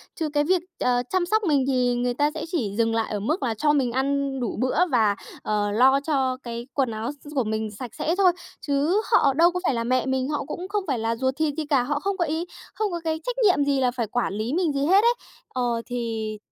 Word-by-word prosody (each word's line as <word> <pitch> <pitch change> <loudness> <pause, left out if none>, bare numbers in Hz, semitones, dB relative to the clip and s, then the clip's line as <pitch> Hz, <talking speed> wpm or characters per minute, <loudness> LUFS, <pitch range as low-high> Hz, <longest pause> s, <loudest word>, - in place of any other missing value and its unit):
Chứ 320 -3 -2
cái 290 0 +3
việc, 360 +2 +2 0.2
ờ, 245 0 +2
chăm 370 -2 +1
sóc 435 +3 +1
mình 290 -6 +2
thì 250 -2 +2
người 245 0 0
ta 290 +3 +1
sẽ - - -5
chỉ 235 - -1
dừng 225 0 +2
lại 225 -1 -1
ở 205 - -1
mức 300 - -1
là 235 -3 0
cho 295 +7 +2
mình 260 -4 +1
ăn 275 +1 0
đủ 240 - -3
bữa, 255 +2 0
và, 220 -5 +3 0.3
ờ, 205 -1 0
lo 265 +5 +5
cho 265 -4 0
cái 235 +1 -6
quần 265 -4 +1
áo 220 +3 -3
s 295 - -13
s - - -10
của 260 - +2
mình 220 -1 -2
sạch 235 +3 -8
sẽ 325 +3 +1
thôi. 380 -2 +5 0.3
Chứ 295 +8 +1
họ 280 - +5
đâu 340 +4 +5
có 360 - -2
phải 280 - +2
là 230 -1 -1
mẹ 255 +1 +1
mình, 265 +1 -1
họ 295 - -2
cũng 365 +2 -6
không 405 0 -1
phải 265 -6 0
là 225 +1 0
ruột 260 +2 -1
thịt 310 -2 +1
gì 315 - -2
cả, 275 -4 +2
họ 290 +2 -1
không 395 +3 -2
có 345 - +1
ý, 320 +2 -2 0.3
không 425 -2 -1
có 345 - -3
cái 320 -1 -1
trách - - -3
nhiệm 360 -9 +4
gì 280 -1 +1
là 250 -1 +2
phải 240 -2 -3
quản 220 -2 -1
lý 220 +5 -2
mình 335 -3 +1
gì 280 0 0
hết 385 +5 +5
ấy. 475 +1 +5 0.4
Ờ, 240 -2 -1
thì 225 -3 -3
270 Hz, 265 wpm, -24 LUFS, 240-315 Hz, 0.4 s, lo